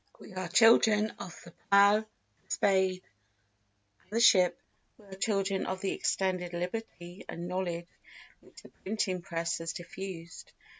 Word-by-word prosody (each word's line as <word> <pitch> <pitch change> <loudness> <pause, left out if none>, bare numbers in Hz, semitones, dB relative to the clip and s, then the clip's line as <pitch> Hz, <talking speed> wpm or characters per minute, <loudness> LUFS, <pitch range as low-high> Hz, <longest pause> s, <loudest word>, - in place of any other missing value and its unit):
We - - -13
are 185 -1 -4
children 220 +2 +5
of 175 - -8
the 170 - -12 0.2
plough, 200 +1 +6
the 220 - -9 0.5
spade, 190 -2 +2 1.0
and - - -31
the 220 +3 -1
ship; 185 -7 +5 0.4
we 210 - -19
are 195 - -13
children 195 -1 -1
of 185 0 -3
the 195 - -1
extended 185 -2 -1
liberty 180 -1 -6
and 170 +1 -5
knowledge 175 -2 -3 0.5
which - - -17
the - - -14
printing 190 -3 -3
press 170 -2 -3
has 165 0 -4
diffused. 175 -1 -8
190 Hz, 145 wpm, -30 LUFS, 175-200 Hz, 1.0 s, plough